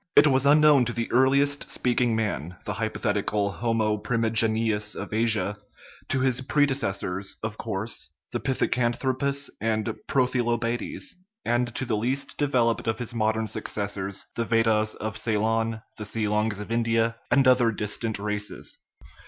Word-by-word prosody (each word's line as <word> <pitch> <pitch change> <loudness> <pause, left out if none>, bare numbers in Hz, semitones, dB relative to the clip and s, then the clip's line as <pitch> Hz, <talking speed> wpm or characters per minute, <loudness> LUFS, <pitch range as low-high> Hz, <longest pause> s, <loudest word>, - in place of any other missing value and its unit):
It 145 - +8
was 135 -2 +3
unknown 150 -3 +6
to 120 - -2
the 115 -1 -3
earliest 140 +3 +3
speaking 120 -2 +1
man 90 -7 -2
(the 105 - -2
hypotheti 110 -1 -1
cal 100 -1 0
homo 110 +1 0
primigenius 110 -1 +1
of - - -6
Asia), 105 -3 +1 0.5
to 130 - +1
his 130 -1 +2
predecessors, 130 -9 0
of 110 0 -4
course, 110 0 -4 0.2
the - - -2
pithecanthropus 130 +2 0
and 110 -1 0 0.2
prothylobates, 120 -3 0 0.3
and 120 0 0
to 130 - -1
the 115 -4 0
least 130 +6 -1
developed 120 -7 +1
of 110 0 0
his 120 0 -3
modern 110 -1 0
successors, 100 -2 -3
the 115 - -1
Ved 115 0 +2
dahs 110 -1 +1
of 110 0 -5
Ceylon, 110 0 0 0.2
the - - -4
Seelongs 105 0 0
of 105 +2 -7
India, 115 0 +1
and 135 -2 +4
other 125 -2 +5
dis 105 -1 -2
tant 115 -2 -2
races. 105 0 -3
115 Hz, 145 wpm, -26 LUFS, 105-125 Hz, 0.5 s, It